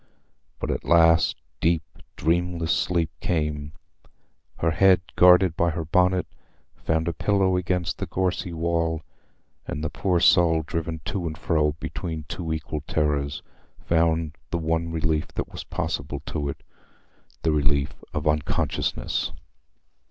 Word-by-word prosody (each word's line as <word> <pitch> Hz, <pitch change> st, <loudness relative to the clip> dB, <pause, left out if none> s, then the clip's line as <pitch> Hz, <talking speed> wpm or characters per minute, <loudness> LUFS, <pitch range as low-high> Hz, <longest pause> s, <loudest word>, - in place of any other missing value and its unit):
But -, -, -2 dB
at -, -, -3 dB
last 85 Hz, -1 st, +5 dB, 0.2 s
deep 85 Hz, -1 st, +2 dB, 0.3 s
dreamless 85 Hz, 0 st, 0 dB
sleep 85 Hz, -3 st, 0 dB
came; 75 Hz, -3 st, -2 dB, 0.8 s
her 80 Hz, -, +1 dB
head, 95 Hz, 0 st, +5 dB
guarded 90 Hz, -1 st, +6 dB
by 85 Hz, 0 st, +2 dB
her 80 Hz, 0 st, -3 dB
bonnet, 90 Hz, +3 st, +3 dB, 0.5 s
found 80 Hz, +1 st, -1 dB
a 85 Hz, -, 0 dB
pillow 95 Hz, -1 st, +2 dB
against 90 Hz, -1 st, -1 dB
the -, -, -3 dB
gorsy 90 Hz, -1 st, -1 dB
wall, 85 Hz, -1 st, -1 dB, 0.6 s
and 75 Hz, -, -4 dB
the 80 Hz, -, -2 dB
poor 90 Hz, -3 st, +1 dB
soul, 80 Hz, -1 st, +5 dB
driven 80 Hz, 0 st, -4 dB
to 95 Hz, -3 st, -2 dB
and 80 Hz, -1 st, -5 dB
fro 75 Hz, -1 st, +1 dB
between 80 Hz, +1 st, -5 dB
two 80 Hz, -1 st, -4 dB
equal 80 Hz, -1 st, -3 dB
terrors, 75 Hz, -2 st, 0 dB, 0.3 s
found 80 Hz, -2 st, +1 dB
the 85 Hz, -, -1 dB
one 80 Hz, 0 st, -1 dB
relief 80 Hz, -1 st, 0 dB
that -, -, -3 dB
was -, -, -6 dB
possible 70 Hz, -, -3 dB
to 75 Hz, -3 st, -3 dB
it—the 80 Hz, +3 st, -8 dB
relief 70 Hz, -2 st, +1 dB, 0.2 s
of 75 Hz, 0 st, -2 dB
unconsciousness. 75 Hz, 0 st, 0 dB
80 Hz, 130 wpm, -25 LUFS, 75-85 Hz, 0.8 s, guarded